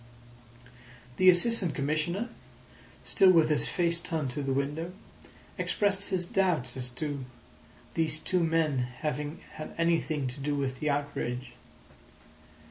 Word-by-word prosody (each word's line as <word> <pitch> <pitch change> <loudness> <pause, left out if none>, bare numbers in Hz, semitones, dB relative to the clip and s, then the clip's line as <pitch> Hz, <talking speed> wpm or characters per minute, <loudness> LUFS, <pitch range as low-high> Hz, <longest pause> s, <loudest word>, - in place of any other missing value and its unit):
The 185 - +7
Assistant 180 - +4
Commissioner, 155 - -1 0.7
still 195 -3 +5
with 165 -4 +5
his 150 -1 +2
face 170 -1 +2
turned 160 -6 -2
to 145 - -3
the 135 -1 -2
window, 145 +6 -2 0.7
expressed 200 -1 +1
his 185 -3 0
doubt 170 -10 +1
as 125 -1 -3
to 145 -2 -3 0.7
these 155 -2 +1
two 180 +2 0
men 160 -4 +2
having 145 +5 -3 0.2
had 155 - -7
anything 165 -3 +1
to 125 - -9
do 145 +1 -1
with 130 -2 -2
the 150 - 0
outrage. 140 -3 -2
155 Hz, 130 wpm, -29 LUFS, 140-175 Hz, 0.7 s, The